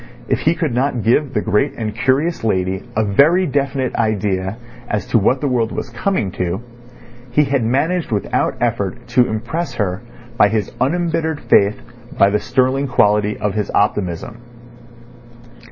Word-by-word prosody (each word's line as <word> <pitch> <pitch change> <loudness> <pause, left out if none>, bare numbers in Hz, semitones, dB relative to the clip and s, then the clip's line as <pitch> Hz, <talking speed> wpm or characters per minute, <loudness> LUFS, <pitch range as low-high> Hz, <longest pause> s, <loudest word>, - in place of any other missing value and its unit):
If - - +1
he 160 +2 +2
could 155 -8 -1
not 125 -2 0
give 135 +4 +1
the 105 - +1
great 135 +7 +1
and 110 -2 -3
curious 135 +8 0
lady 95 -3 0 0.2
a 110 - +2
very 150 - +4
definite 135 -3 -1
idea 105 -3 -1 0.3
as 105 -2 -1
to 115 - +4
what 125 +6 +2
the 145 - 0
world 120 -4 0
was 125 - -5
coming 120 - -1
to, 90 +5 -3 0.7
he 150 +5 +3
had 135 -3 0
managed 150 +8 0
without 105 -3 0
effort - - -2
to 125 -1 +3
impress 120 +11 -3
her 95 -4 -2 0.4
by 105 - +5
his 105 -2 -1
unembittered 160 +1 0
faith, 100 +1 +3 0.4
by 100 - +5
the 105 - +1
sterling 130 +4 +1
quality 105 -4 +2
of 105 -2 -2
his 105 -1 -2
optimism. 105 +2 -1
115 Hz, 155 wpm, -18 LUFS, 105-140 Hz, 0.7 s, by